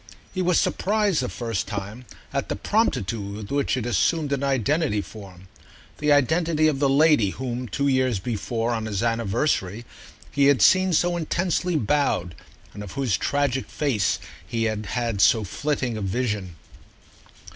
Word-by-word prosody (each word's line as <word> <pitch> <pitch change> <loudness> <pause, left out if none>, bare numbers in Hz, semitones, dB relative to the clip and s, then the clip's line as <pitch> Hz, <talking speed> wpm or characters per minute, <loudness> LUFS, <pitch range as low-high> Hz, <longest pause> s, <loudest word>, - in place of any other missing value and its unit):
He 185 - -1
was 180 -1 +3
surprised, 205 -6 +1
the 125 - -2
first 115 -6 -3
time, 105 +4 -6 0.3
at 140 -1 -2
the - - -1
promptitude 105 - -1
with 105 -1 -8
which 140 -1 0
it 120 - -3
assumed 145 +4 +1
an 140 0 -1
identity 140 -1 +1
for 100 -2 -9
him—the 95 +10 -7
identity 155 +3 +3
of 145 -3 0
the 140 -1 +2
lady 145 -6 +4
whom 125 +3 -4
two 140 +7 -1
years 130 -4 +2
before, 115 +3 -2
on 110 -2 -2
his 105 0 -2
anniversary, 115 -1 0 0.5
he 140 -1 +2
had 140 -2 +4
seen 185 0 +5
so 175 +2 +2
intensely 175 +1 -1
bowed, 135 - 0 0.4
and 105 - -8
of 100 -3 -8
whose 130 -7 0
tragic 140 0 -1
face 125 -10 0 0.3
he 115 -2 -2
had 110 -2 -2
had 115 -3 -1
so 110 0 +5
flitting 130 +2 -2
a - - -4
vision. 100 -3 -2
125 Hz, 155 wpm, -24 LUFS, 105-150 Hz, 0.5 s, seen